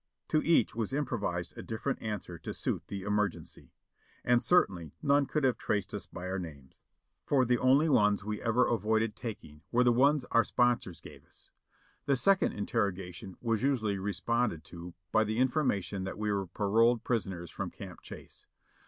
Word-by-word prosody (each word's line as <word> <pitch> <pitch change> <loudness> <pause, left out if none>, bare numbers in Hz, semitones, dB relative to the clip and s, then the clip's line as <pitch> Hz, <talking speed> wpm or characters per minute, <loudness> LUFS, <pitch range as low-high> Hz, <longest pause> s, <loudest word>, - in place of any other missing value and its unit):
To 155 - +3
each 165 -9 +3
was 115 +2 -3
improvised 105 -11 -2
a - - -7
different 110 -1 -3
answer 105 -6 -5
to - - -6
suit - - -2
the 100 -2 -5
emer 105 0 +2
gency; - - -11 0.6
and 120 0 +4
certainly 90 - +2
none 140 -1 +3
could 150 - -1
have 125 -3 +2
traced 105 -2 -1
us - - -5
by 90 - -7
the 95 +1 -2
names, 75 -7 -10 0.4
for 135 -3 +2
the 125 0 +2
only 135 +5 +4
ones 105 -8 +3
we 105 0 -4
ever 120 +2 +3
avoided 110 0 +1
taking 90 -11 -8
were 125 +1 +4
the 120 - +5
ones 140 +3 +3
our 115 0 +5
sponsors 120 -9 0
gave - - -13
us. - - -14 0.6
The 140 - +4
second 195 +8 +3
interrogation 95 -2 -3
was 115 -3 0
usually 110 -8 0
responded 105 -2 -1
to 85 0 -9 0.2
by 110 - +4
the 110 +1 -2
in 130 +1 +4
formation 100 - -1
that 95 - -5
we 105 0 -1
were 100 -2 -1
paroled 115 +5 +2
prisoners 95 -8 -2
from - - -4
Camp - - -10
Chase. - - -11
110 Hz, 180 wpm, -31 LUFS, 95-125 Hz, 0.6 s, the